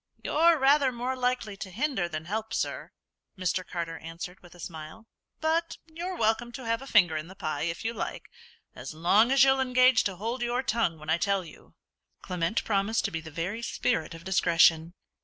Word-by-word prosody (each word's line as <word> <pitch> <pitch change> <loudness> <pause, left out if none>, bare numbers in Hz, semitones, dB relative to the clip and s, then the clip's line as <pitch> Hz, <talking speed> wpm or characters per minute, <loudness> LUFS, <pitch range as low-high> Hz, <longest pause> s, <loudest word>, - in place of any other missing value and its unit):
"You're 330 +2 +4
rather 275 -1 +4
more 250 +2 -3
likely 250 -4 -1
to 195 - -7
hinder 210 - -1
than 155 -1 -5
help, 220 +4 -3
sir," - - -3 0.5
Mr. 185 0 -1
Carter 170 -2 -5
answered, 165 +3 -8
with 175 -1 -16
a - - -16
smile; 160 +5 -9 0.4
"but 320 +1 0
you're 340 +3 -6
welcome 225 +2 +1
to 260 -1 -7
have 230 +1 0
a 270 - -9
finger 180 -10 +4
in 155 +1 -4
the 190 - -12
pie 155 -6 -3
if 165 +6 -6
you 230 - -1
like, 220 - -5 0.5
as 130 +5 -8
long 200 +9 +4
as 270 -1 +6
you'll 270 0 +4
engage 255 -1 +4
to 195 - -1
hold 230 +7 -4
your 240 +2 0
tongue 225 -10 0
when 155 +1 -5
I 165 - +2
tell 195 -1 0
you." 160 - -16 0.5
Clement 180 +3 -1
promised 210 +2 0
to 200 - -1
be 165 -1 -3
the 160 - -9
very 170 +9 -4
spirit 160 -8 -1
of 165 - -11
discretion. 170 -2 +3
200 Hz, 195 wpm, -28 LUFS, 170-250 Hz, 0.5 s, as